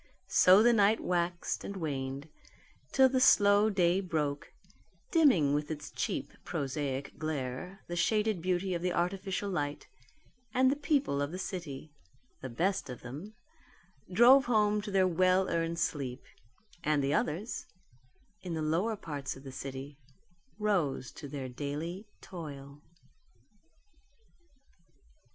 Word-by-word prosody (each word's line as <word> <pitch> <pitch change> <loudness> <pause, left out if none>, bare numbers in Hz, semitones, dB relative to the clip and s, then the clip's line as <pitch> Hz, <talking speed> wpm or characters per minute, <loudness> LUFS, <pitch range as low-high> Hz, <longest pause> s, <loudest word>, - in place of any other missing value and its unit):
So 190 +4 +7
the 240 0 +6
night 210 0 +4
waxed 175 -1 -1
and 200 - -6
waned 140 -3 -4 0.6
till 265 -1 +6
the 260 0 +1
slow 205 -5 +6
day 185 -2 +2
broke, 150 -6 -2 0.6
dimming 220 - +4
with 150 0 -1
its 150 -2 -6
cheap - - -3
prosaic 135 -1 -3
glare 155 +4 -4
the 175 - -4
shaded 210 +1 +1
beauty 185 +1 0
of 170 - -2
the 180 0 0
artificial 190 +3 -1
light, 145 -4 -3 0.7
and 260 +1 +5
the - - +1
people 285 - 0
of 145 +1 -2
the 180 - -5
city 155 -6 -6 0.5
the 130 - -5
best 185 +11 -1
of 125 - -7
them 150 - -8 0.8
drove 250 +7 +7
home 210 -3 +2
to 205 - -6
their 190 -2 +3
well 185 +2 +3
earned 165 0 -1
sleep; 135 -6 -2 0.6
and 150 -2 +2
the 140 +1 +1
others 180 +8 -2 0.7
in 180 -3 -4
the 160 - -2
lower 175 +9 0
parts 145 -8 -5
of 135 - -13
the 135 - -8
city 135 +2 -7 0.6
rose 180 - 0
to 145 - -9
their 135 -2 -5
daily 150 - -5
toil. 145 -5 -9
170 Hz, 135 wpm, -31 LUFS, 145-200 Hz, 0.8 s, So